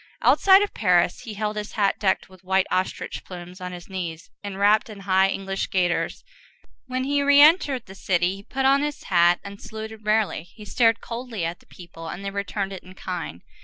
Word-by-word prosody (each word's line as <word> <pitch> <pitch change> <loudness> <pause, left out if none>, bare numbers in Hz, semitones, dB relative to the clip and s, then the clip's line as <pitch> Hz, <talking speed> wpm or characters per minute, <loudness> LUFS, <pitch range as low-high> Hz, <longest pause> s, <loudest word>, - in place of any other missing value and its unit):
Outside 390 +1 +6
of 410 - -4
Paris, 180 -4 +2
he 220 -3 -8
held 210 +1 -2
his 210 0 -5
hat 200 -2 +1
decked 195 -3 +1
with 185 -1 -18
white 190 0 +2
ostrich 185 +1 -2
plumes 180 0 -10
on 180 0 -5
his 175 -1 -9
knees 175 -4 -6
enwrapped 205 +2 +2
in 205 -2 -10
high 190 0 +3
English 195 0 -3
gaiters; 180 -4 0 0.6
when 255 0 -2
he 285 +1 +1
re 285 0 +5
entered 290 -5 +5
the 190 - -11
city, 185 -1 0
he - - -11
put 265 +6 -3
on 275 +1 +5
his 295 0 -3
hat 175 -1 +4
and 200 0 -9
saluted 220 0 -8
rarely; 215 -4 +1
he 210 - -11
stared 230 +1 +2
coldly 230 -6 -5
at 170 +1 -4
the - - -25
people, 165 -2 -11
and 195 +4 -7
they 195 - -3
returned 200 0 -3
it 190 - -7
in 185 +1 -15
kind. 170 - -6
195 Hz, 200 wpm, -24 LUFS, 185-225 Hz, 0.6 s, Outside